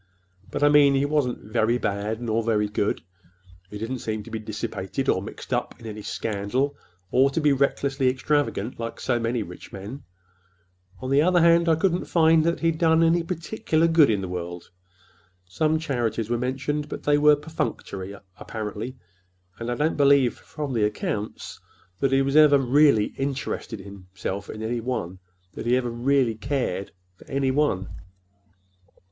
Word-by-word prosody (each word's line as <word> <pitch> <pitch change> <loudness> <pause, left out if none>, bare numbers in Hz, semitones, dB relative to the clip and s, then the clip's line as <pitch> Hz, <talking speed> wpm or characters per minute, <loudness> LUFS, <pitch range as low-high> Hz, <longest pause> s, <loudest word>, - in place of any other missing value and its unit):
But - - -2
I 145 - +6
mean, 145 -2 +6
he 135 +1 +2
wasn't 145 -4 0
very 115 +1 +2
bad, 105 +1 -2
nor 115 -1 0
very 110 -2 +1
good. 105 0 -1 0.7
He 105 - -7
didn't 115 +4 -4
seem 110 -2 -3
to - - -12
be 110 - -3
dissipated, 110 +3 -4
or 95 - +2
mixed 100 - -7
up - - -2
in - - -13
any 105 -1 -6
scandal, 115 +8 -2 0.4
or 135 +2 +4
to 140 - -1
be 150 -2 +3
recklessly 135 -1 +1
extravagant, 130 -4 -1
like 115 0 -5
so 120 - 0
many 115 0 -1
rich 90 -2 -11
men. 105 +9 -8 1.0
On 130 - -4
the 140 +1 +5
other 180 +2 +4
hand, 170 0 +5
I 160 - +5
couldn't 175 +2 0
find 160 -1 +4
that 170 0 0
he'd 165 -1 +1
done 165 -1 +4
any 165 +1 +3
particular 165 -1 0
good 160 -4 +5
in 105 -3 +1
the 95 - -4
world. 90 -1 -6 0.7
Some 155 - +1
charities 120 -7 -2
were - - +2
mentioned, 135 +4 -2
but - - -6
they 145 0 +3
were 150 0 +6
perfunctory, 100 -10 -4 0.2
apparently, 110 +3 -5 0.6
and 115 +1 -4
I 120 - 0
don't 150 +4 0
believe, 140 -3 +5
from 145 -3 -6
the 115 -3 +1
accounts, 105 0 -3 0.4
that 135 - +1
he 135 0 +3
ever 145 -2 +6
really 135 -4 +4
interested 135 -5 -3
himself 95 0 -7
in 110 - -6
any 120 +2 -1
one—that 95 -5 -6
he 125 +1 +4
ever 125 -2 -2
really 125 0 +2
cared 110 -5 -2 0.3
for—any 135 +3 -1
one." 130 -10 +1
130 Hz, 165 wpm, -25 LUFS, 105-145 Hz, 1.0 s, I